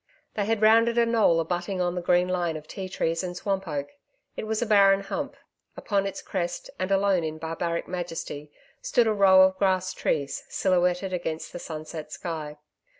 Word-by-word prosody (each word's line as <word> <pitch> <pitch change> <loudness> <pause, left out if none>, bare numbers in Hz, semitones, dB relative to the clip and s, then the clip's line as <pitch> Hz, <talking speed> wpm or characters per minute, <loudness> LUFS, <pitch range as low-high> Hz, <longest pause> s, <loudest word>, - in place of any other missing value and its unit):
They 205 - -1
had 220 0 0
rounded 230 +2 +5
a 235 - +5
knoll 225 -8 +3
abutting 175 +3 -2
on 175 -1 0
the 180 - -3
green 180 +1 +3
line 175 -3 -1
of 155 0 -12
ti 190 -2 -6
trees 165 -2 -1
and 180 -1 -5
swamp 195 -1 -2
oak. 145 -2 -3 0.5
It 215 - -5
was 220 0 -1
a 240 - 0
barren 200 -2 +5
hump; 195 - -5 0.4
upon 200 -2 0
its 195 - -6
crest, 175 -2 -4
and 185 0 -1
alone 195 -2 +3
in 155 0 -4
barbaric 165 +1 -3
majesty, 165 -4 -5 0.3
stood - - +2
a 220 - +2
row 190 -2 +7
of 190 0 +2
grass 185 -1 +1
trees 140 -3 -2
silhouetted 180 0 +1
against 160 -3 -4
the 175 - -6
sunset 155 -1 -7
sky. 155 -4 -5
180 Hz, 185 wpm, -26 LUFS, 165-195 Hz, 0.5 s, row